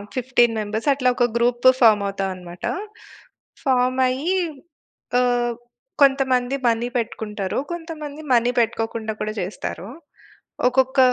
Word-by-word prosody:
15 240 -2 +2
members 215 +5 -3
అట్లా 255 -2 +1
ఒక 245 - +3
group 240 +1 +2
form 215 -3 +6
అవుతాం 195 -1 -2
అన్నమాట. 175 -1 -12 1.0
ఫార్మ్ 255 -1 +2
అయ్యి 285 +9 -1 0.8
ఆహ్, 245 -1 +1 0.5
కొంతమంది 270 -2 +3
మనీ 230 +1 +1
పెట్టుకుంటారు. 215 -3 -3
కొంతమంది 310 -3 -6
మనీ 240 0 +3
పెట్టుకోకుండా 225 -1 -1
కూడా 215 - -2
చేస్తారు. 185 +1 -5 0.8
ఒక్కొక్క 265 +1 +2
245 Hz, 110 wpm, -22 LUFS, 220-260 Hz, 1.0 s, ఫార్మ్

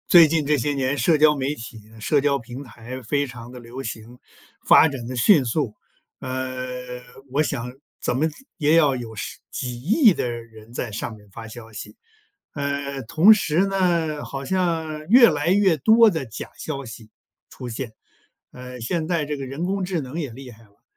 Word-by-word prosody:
最 170 -3 +9
近 155 -1 0
这 150 +1 +2
些 145 +3 0
年 135 0 -1
社 150 +6 +3
交 150 0 +5
媒 140 +2 -1
体 115 -1 -9
呢 110 0 -16
社 145 +6 +2
交 140 0 +2
平 125 +2 -9
台 120 +1 -9
非 140 +5 0
常 120 -1 -10
地 125 - -10
流 120 +2 -8
行， 115 0 -8 0.5
发 - - +8
展 135 -4 -6
得 130 - -5
迅 140 - +5
速， 120 -1 -1 0.5
呃， 130 -1 -5 0.3
我 140 +3 +2
想 125 -3 -4 0.3
怎 125 - 0
么 150 - +2 0.3
也 155 -1 +3
要 150 -5 +4
有 115 -2 -7 0.4
几 125 -2 -4
亿 220 - +5
的 125 - -2
人 115 -1 -9
在 120 -2 -4
上 110 +2 -5
面 105 -1 -19
发 115 +3 -9
消 115 0 -11
息， 105 - -9 0.6
呃， 140 -1 -3
同 160 - +6
时 185 -3 +1
呢， 170 -6 0
好 135 0 -6
像 160 -2 -1
越 235 +4 +8
来 150 +1 0
越 190 -4 +4
多 220 - +6
的 160 -8 -3
假 110 -4 -8
消 140 -3 -5
息 115 -1 -11 0.4
出 125 - -8
现。 115 0 -5 0.6
呃， 125 -1 -9
现 155 +7 -2
在 170 -3 0
这 150 0 -3
个 135 - -5
人 135 +5 -5
工 195 +1 -1
智 180 -3 -2
能 135 +5 -6
也 145 -5 -3
厉 130 +2 -10
害 115 0 -17
了， 100 -2 -27
135 Hz, 205 characters per minute, -23 LUFS, 120-155 Hz, 0.6 s, 最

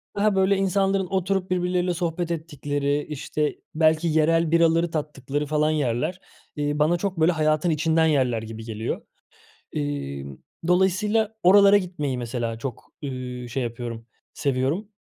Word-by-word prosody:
daha, 205 0 +2
böyle, 190 +1 +3
insanların 195 0 +1
oturup 190 0 -1
birbirleriyle 180 0 +1
sohbet 170 0 -2
ettikleri, 145 -3 -2
işte, 150 +1 -2 0.2
belki 160 +1 +3
yerel 160 +1 +2
biraları 165 0 +3
tattıkları 145 -2 -3
falan 155 +1 +1
yerler, 145 +4 -1 0.4
eee, 145 0 -1
bana 160 +4 +3
çok, 190 0 -3
böyle, 165 +3 +5
hayatın 155 +1 +1
içinden 160 +1 +2
yerler 130 -7 +1
gibi 110 0 -8
geliyor. 110 0 -4 0.7
Emm, 70 -2 -4 0.3
dolayısıyla 205 +4 +2
oralara 200 +2 +7
gitmeyi 175 -9 -3
mesela, 120 -1 -3
çok, 130 -3 -7
ııı, 125 -3 -5
şey 130 +1 -2
yapıyorum, 115 -1 -6 0.3
seviyorum. 140 +9 -1
155 Hz, 130 wpm, -24 LUFS, 130-180 Hz, 0.7 s, oralara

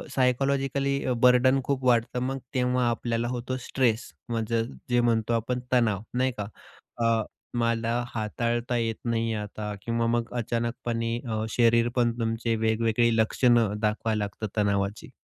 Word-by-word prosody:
Psychologically 135 +1 +1
अ, 125 - +1
burden 130 +2 +5
खूप 135 -1 -1
वाढतं. 120 0 +2
मग 135 +1 -2
तेव्हा 125 -1 +1
आपल्याला 115 0 -1
होतो 125 +1 -3
स्ट्रेस 120 -3 0 0.2
म्हणजे 115 0 0 0.3
जे 120 0 +3
म्हणतो 115 -1 +1
आपण 115 +2 -1
तणाव. 110 -5 +3
नाही 130 +1 +1
का? 105 - -3 0.5
अ, 115 -2 +2 0.3
मला 115 +1 +1
हाताळता 120 +2 -1
येत 115 -1 0
नाही 115 -1 0
आहे 105 -1 -2
आता 105 0 -5
किंवा 115 0 0
मग 120 0 -1
अचानकपणे 115 0 -2
अ, 110 -1 -1
शरीर 115 0 +3
पण 120 -1 +3
तुमचे 115 0 0
वेगवेगळी 115 +1 +2
लक्षणं 115 -1 +3
दाखवायला 105 0 0
लागतात 105 +1 -7
तणावाची. 100 0 0
115 Hz, 140 wpm, -27 LUFS, 115-125 Hz, 0.5 s, burden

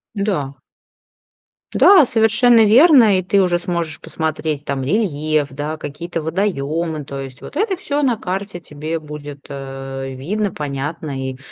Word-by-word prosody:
Да. 190 -10 -1 1.2
Да, 385 -5 +7
совершенно 225 +1 +4
верно. 235 - +6
И 185 - -3
ты 200 +1 +2
уже 180 -2 +2
сможешь 170 -3 -4
посмотреть 155 -2 -3
там 135 -1 -2
рельеф, 155 - 0
да, 150 +3 -4
какие-то 165 +3 -5
водоемы, 160 -3 -2
то 140 -1 -6
есть 130 -2 -9
вот - - -10
это 390 +1 0
всё 290 -4 -2
на 245 -5 +2
карте 190 -1 -4
тебе 155 0 -5
будет, 145 -2 -9
э, 135 -1 -6
видно, 195 +10 -2
понятно, 140 -2 -4
и 130 - -8
160 Hz, 140 wpm, -19 LUFS, 145-200 Hz, 1.2 s, Да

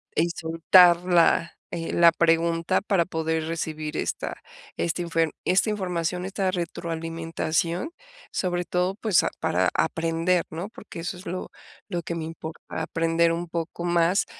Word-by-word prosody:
y 170 +2 +2
soltar 170 +1 +5
la, 175 -1 +3 0.2
eh, 165 -1 -3
la 170 -1 +7
pregunta 165 0 +2
para 195 -3 +2
poder 160 -2 -1
recibir 155 -2 -3
esta - - -3 0.4
esta 170 +1 -1
infer 165 -2 0
esta 185 +4 +3
información, 180 -3 -2
esta 195 0 -1
retroalimentación, 165 - -2 0.4
sobre 180 -1 -1
todo, 180 +2 0
pues, 210 -4 +2
ah, - - +1
para - - +2
aprender, 165 - +1
¿no? 170 +5 -5
Porque 210 -5 -10
eso 180 +2 -4
es 180 - -12
lo 185 +2 -5 0.4
lo 175 -3 -2
que 170 +1 -4
me 165 - -3
importa, 160 0 -7
aprender 165 +1 +1
un 170 0 -4
poco 170 +1 -4
más 175 +2 +2
170 Hz, 145 wpm, -25 LUFS, 165-180 Hz, 0.4 s, la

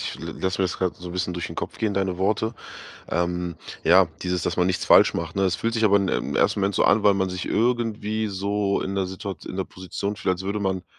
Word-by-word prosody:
Ich - - -4
l - - -6
lasse 95 0 -1
mir 95 - +3
das 90 - -2
grad 95 -2 -1
so 90 -1 -8
'n - - -7
bisschen 90 -1 -2
durch 85 0 -3
den - - -9
Kopf - - -5
gehen, 110 -2 0
deine 95 -2 -1
Worte. 110 +3 0 0.5
Ähm, 85 0 -1 0.3
ja, 90 +2 +6
dieses, 90 -1 -1
dass 90 - -2
man 90 0 +3
nichts 95 - 0
falsch - - +6
macht, 85 0 -4
ne, 95 - +2
es 95 -2 +2
fühlt 115 0 -2
sich 110 -1 +2
aber 100 -1 +5
in 100 -1 0
im - - -1
1. - - +2
Moment 100 0 0
so - - +3
an, 110 - +4
weil 105 - +6
man 95 -1 0
sich 90 -1 -4
irgendwie 110 -2 0
so 100 0 -1
in 95 - -3
der 95 -1 +1
Situat 95 -2 -7
in - - -6
der 95 - -1
Position 95 +3 -5
fühlt, 95 - +1
als 95 +1 -7
würde 100 +2 -2
man 95 -2 -1
95 Hz, 270 wpm, -24 LUFS, 90-100 Hz, 0.5 s, ja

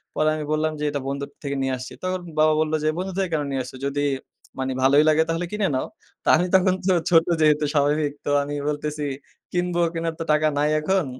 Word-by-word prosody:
পরে 155 0 +2
আমি 155 -1 -4
বললাম 155 +1 +1
যে, - - -3
"এটা 145 -1 -3
বন্ধুর 140 +1 -3
থেকে 140 -1 -2
নিয়ে 135 0 0
আসছি।" 125 - -8
তখন 185 0 -1 0.2
বাবা 155 0 +5
বলল 155 0 -1
যে, - - +1
"বন্ধু 185 +2 -3
থেকে 190 -2 0
কেন 150 -2 +1
নিয়ে 135 -1 -1
আসছো? 130 +1 -10
যদি 140 +1 -1 0.6
মানে 130 0 -1
ভালোই 140 +3 +6
লাগে 155 +1 +4
তাহলে 165 +2 -1
কিনে 210 -2 0
নাও।" 130 - -1 0.4
তা - - -12
আমি 175 - +1
তখন 185 0 +4
তো 190 - +5 0.2
ছোট 165 -2 +5 0.2
যেহেতু 150 -1 +4
স্বাভাবিক, 145 0 +2
তো - - -1
আমি 145 +1 -4
বলতেছি, 150 0 -3 0.5
"কিনব, 180 0 -1 0.2
কিনার 165 0 -2
তো - - -1
টাকা 155 +1 +3
নাই 150 +1 +2
এখন। 185 +3 +1
155 Hz, 220 wpm, -23 LUFS, 145-165 Hz, 0.6 s, ভালোই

